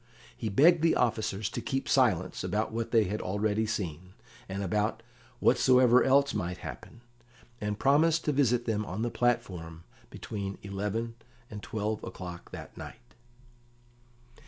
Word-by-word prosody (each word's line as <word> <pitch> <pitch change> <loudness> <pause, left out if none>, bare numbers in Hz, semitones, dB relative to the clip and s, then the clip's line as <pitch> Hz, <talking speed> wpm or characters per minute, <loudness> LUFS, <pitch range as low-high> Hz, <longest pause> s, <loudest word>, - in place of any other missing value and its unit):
He 110 - -3
begged 155 - +5
the 165 0 +3
officers 110 -4 0
to - - -4
keep 135 0 -2
silence 110 -10 +2
about 105 +4 -1
what 115 0 -3
they 115 -2 +4
had 105 +2 -3
already 105 +3 0
seen, 90 -4 -4 0.3
and 100 +1 -3
about 105 +3 -1 0.4
whatsoever 125 -1 +5
else 140 +1 +4
might 90 0 -3
happen, 120 - -9 0.6
and 105 0 -2
promised 155 +6 +3
to 150 - +2
visit 125 -4 +2
them 110 -2 0
on 105 +2 -4
the 120 - -1
platform 90 -9 -1 0.3
between 100 -2 -5
eleven 105 +4 -3 0.3
and 105 -1 -7
twelve 110 0 -3
o'clock 90 -2 -8
that - - -9
night. - - -11
110 Hz, 140 wpm, -29 LUFS, 100-120 Hz, 0.6 s, begged